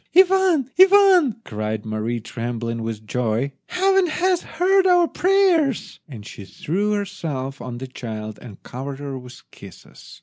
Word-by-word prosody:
"Ivan! 370 Hz, -7 st, +4 dB
Ivan!" 375 Hz, -, +5 dB
cried 110 Hz, -1 st, -4 dB
Mary, 110 Hz, +2 st, -3 dB
trembling 115 Hz, 0 st, -5 dB
with 110 Hz, -1 st, -5 dB
joy, 120 Hz, +3 st, -1 dB, 0.2 s
"Heaven 385 Hz, 0 st, +2 dB
has 360 Hz, +2 st, 0 dB
heard 375 Hz, +3 st, +2 dB
our 355 Hz, -2 st, +4 dB
prayers," 360 Hz, -, +1 dB
and 110 Hz, -7 st, -10 dB
she 105 Hz, -, -10 dB
threw 195 Hz, -, -2 dB
herself 160 Hz, -10 st, -4 dB
on 125 Hz, -1 st, -6 dB
the 130 Hz, -, -6 dB
child 110 Hz, -4 st, -7 dB
and 110 Hz, -5 st, -12 dB
covered 135 Hz, +2 st, -7 dB
her 140 Hz, -2 st, -6 dB
with 125 Hz, 0 st, -13 dB
kisses. -, -, -14 dB
140 Hz, 140 wpm, -22 LUFS, -, 0.2 s, Ivan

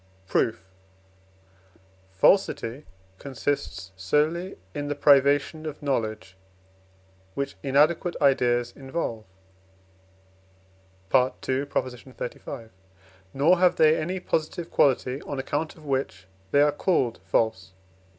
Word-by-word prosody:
Proof. 110 Hz, +1 st, 0 dB, 1.5 s
Falsity 125 Hz, -, +2 dB, 0.3 s
consists 105 Hz, -, -3 dB
solely 150 Hz, -, 0 dB, 0.2 s
in 145 Hz, 0 st, -4 dB
the 145 Hz, -, -2 dB
privation 145 Hz, +2 st, +3 dB
of 150 Hz, 0 st, -7 dB
knowledge 110 Hz, -8 st, -2 dB, 1.0 s
which 140 Hz, 0 st, -3 dB
inadequate 150 Hz, +5 st, +2 dB
ideas 120 Hz, -4 st, +2 dB
involve 135 Hz, -5 st, -4 dB, 1.9 s
(II. 125 Hz, 0 st, +4 dB, 0.3 s
xxxv.), 125 Hz, -2 st, -5 dB, 0.6 s
nor 160 Hz, +7 st, +3 dB
have 180 Hz, -1 st, +4 dB
they 155 Hz, 0 st, +5 dB
any 180 Hz, +4 st, -2 dB
positive 165 Hz, 0 st, -3 dB
quality 130 Hz, 0 st, +2 dB
on 140 Hz, -, -6 dB
account 145 Hz, +4 st, -3 dB
of 155 Hz, -, -16 dB
which 130 Hz, -9 st, -2 dB, 0.2 s
they 145 Hz, +6 st, +4 dB
are 150 Hz, -, +4 dB
called 145 Hz, -7 st, 0 dB
false 105 Hz, 0 st, 0 dB
(II. -, -, -33 dB
140 Hz, 100 wpm, -26 LUFS, 120-155 Hz, 1.9 s, they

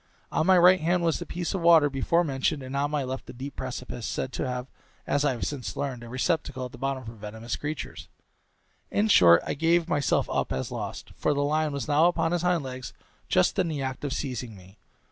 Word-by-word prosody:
On 160 Hz, -, +1 dB
my 190 Hz, -1 st, +6 dB
right 180 Hz, +1 st, +7 dB
hand 170 Hz, +2 st, +1 dB
was 165 Hz, -2 st, +1 dB
the -, -, -7 dB
piece 175 Hz, +1 st, -3 dB
of 190 Hz, -, -2 dB
water 165 Hz, -3 st, +6 dB
before 145 Hz, +5 st, +1 dB
mentioned, 140 Hz, -1 st, -1 dB
and 130 Hz, +1 st, -6 dB
on 140 Hz, +1 st, +1 dB
my 150 Hz, -2 st, -1 dB
left 130 Hz, +1 st, -5 dB
a -, -, -7 dB
deep 135 Hz, +3 st, -7 dB
precipice, 125 Hz, -2 st, -5 dB
said 130 Hz, -, -3 dB
to -, -, -2 dB
have, 125 Hz, 0 st, -3 dB, 0.4 s
as 145 Hz, -, +1 dB
I 145 Hz, -3 st, +2 dB
have 120 Hz, -, -3 dB
since 140 Hz, -4 st, -4 dB
learned, 130 Hz, -4 st, -3 dB
a 120 Hz, -, -9 dB
receptacle 130 Hz, 0 st, -1 dB
at 125 Hz, -, -8 dB
the 125 Hz, -, -12 dB
bottom 135 Hz, 0 st, -2 dB
for 115 Hz, -, -7 dB
venomous 110 Hz, +1 st, -6 dB
creatures; 150 Hz, +1 st, -6 dB, 0.8 s
in 210 Hz, +2 st, +1 dB
short, 85 Hz, -, +7 dB
I -, -, -1 dB
gave 165 Hz, +3 st, +2 dB
myself 145 Hz, -5 st, +1 dB
up -, -, -1 dB
as 65 Hz, 0 st, -3 dB
lost, -, -, -6 dB
for 150 Hz, -, +1 dB
the 140 Hz, -, +1 dB
lion 155 Hz, +1 st, +1 dB
was 140 Hz, 0 st, -4 dB
now 155 Hz, +3 st, +5 dB
upon 165 Hz, -2 st, +1 dB
his 175 Hz, -1 st, 0 dB
hind 175 Hz, -3 st, +1 dB
legs, 130 Hz, -1 st, -7 dB, 0.4 s
just 90 Hz, -, +3 dB
in 180 Hz, -, +2 dB
the 150 Hz, -4 st, -3 dB
act 130 Hz, 0 st, -4 dB
of 145 Hz, -, -2 dB
seizing 125 Hz, -4 st, -4 dB
me. 95 Hz, +2 st, -16 dB
140 Hz, 230 wpm, -27 LUFS, 125-165 Hz, 0.8 s, right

